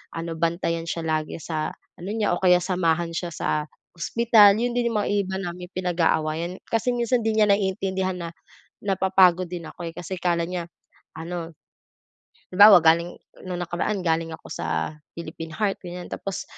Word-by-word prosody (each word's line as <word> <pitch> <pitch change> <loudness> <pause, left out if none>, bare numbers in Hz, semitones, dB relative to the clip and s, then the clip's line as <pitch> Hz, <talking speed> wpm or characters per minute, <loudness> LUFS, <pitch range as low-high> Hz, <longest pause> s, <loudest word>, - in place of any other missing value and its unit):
ano 165 0 -4
bantayan 170 0 -1
siya 165 0 -3
lagi 155 -1 -1
sa 155 -2 -3 0.3
ano 180 - -7
niya 220 -2 0
o - - -5
kaya 180 -1 +5
samahan 170 -2 0
siya 175 0 -3
sa - - -3 0.5
hospital. 215 +2 +5
Yon 240 +2 0
din 240 -1 +1
yung 215 -2 +1
mga - - -2
iba 195 -2 0
naming 180 -1 -6
pinag-aawayan. 170 -1 0
Kasi 245 +2 0
minsan 240 +1 +1
hindi 220 -1 +1
niya 210 - +5
naiintindihan 190 -1 0
na 170 -1 -5 0.5
napapagod 190 -2 +3
din 175 -2 -6
ako, 175 - -8
eh - - -23
kasi 180 +2 -5
akala 170 -1 0
niya 175 -1 -4 0.5
ano 170 0 -5 1.0
halimbawa, 200 -1 +8
galing 170 +2 +3 0.3
nung 180 -1 -4
nakaraan 180 +3 -2
galing 165 -1 0
ako - - -15
sa 80 -1 -2 0.2
Philippine 165 -1 -7
Heart 205 -2 -1
ganyan 180 0 -7
tapos 195 -1 -4
180 Hz, 165 wpm, -24 LUFS, 165-195 Hz, 1.0 s, halimbawa